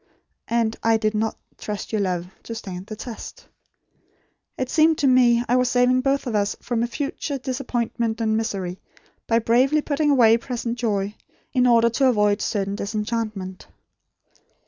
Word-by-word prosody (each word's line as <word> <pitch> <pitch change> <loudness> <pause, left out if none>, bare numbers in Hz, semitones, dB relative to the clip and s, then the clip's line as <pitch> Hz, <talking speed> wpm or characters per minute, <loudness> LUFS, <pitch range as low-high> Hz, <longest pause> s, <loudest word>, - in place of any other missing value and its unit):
And 230 -1 +1
I 225 0 +3
DID 215 -1 0
NOT 220 +1 -1 0.2
TRUST 210 -1 -5
YOUR 215 -2 0
LOVE 180 -3 -1 0.2
TO 230 - -7
STAND 190 -3 -7
THE 215 - -6
TEST. 225 +1 -9 1.1
It 260 - -1
seemed 320 0 +4
to - - 0
me, 245 -2 +5
I 245 - +2
was 250 -1 +2
saving 250 +1 +3
both 275 +1 0
of 245 - -3
us 205 -1 0
from 235 -1 -1
future 280 +3 -3
disappointment 240 -3 -2
and 220 -1 +1
misery, 195 -5 -3 0.5
by 230 - +3
bravely 255 +6 +3
putting 295 0 0
away 230 -5 +6
present 235 0 -4
joy, 205 -3 -1 0.4
in 250 -2 +3
order 235 -1 +5
to 265 +4 +2
avoid 210 -3 +2
certain 195 -2 -1
disenchantment. 210 -3 -4
230 Hz, 155 wpm, -23 LUFS, 210-250 Hz, 1.1 s, away